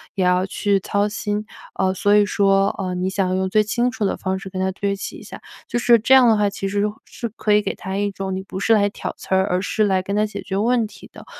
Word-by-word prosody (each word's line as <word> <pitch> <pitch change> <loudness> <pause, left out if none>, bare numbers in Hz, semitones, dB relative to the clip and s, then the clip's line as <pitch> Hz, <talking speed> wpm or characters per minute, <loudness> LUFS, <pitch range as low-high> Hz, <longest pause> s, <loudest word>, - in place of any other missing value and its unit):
也 190 - 0
要 180 0 +3
去 200 0 0
操 200 +2 0
心， 210 0 -3 0.3
呃， 190 0 +1
所 205 +2 +2
以 210 0 +5
说， 195 -1 +2
呃， 185 -2 -2
你 180 +1 -1
想 190 -1 0
用 190 0 0
最 215 +3 +4
清 240 +4 0
楚 220 -4 -2
的 - - -1
方 190 0 -2
式 195 -1 -8
跟 185 0 -6
她 190 0 0
对 200 +1 -2
齐 195 - -7
一 - - -12
下。 - - -10 0.3
就 - - -2
是 235 0 +5
这 230 +5 +3
样 255 -2 +7
的 225 - +5
话， 205 -1 +2
其 195 0 -4
实 200 +1 -1
是 - - +2 0.2
是 235 - -6
可 215 -1 -1
以 210 - +5
给 200 - -3
她 190 0 -6
一 205 0 0
种 195 -1 -4
你 190 - -3
不 190 0 -7
是 225 +3 +3
来 205 -2 +3
挑 - - -6
刺 190 - -2
儿， 190 0 +3
而 180 -1 0
是 215 +2 0
来 190 -2 +2
跟 200 +2 -4
她 210 +1 +2
解 205 -1 -6
决 195 - -4
问 230 +2 +2
题 - - -14
的。 - - -12
200 Hz, 305 characters per minute, -21 LUFS, 190-210 Hz, 0.3 s, 样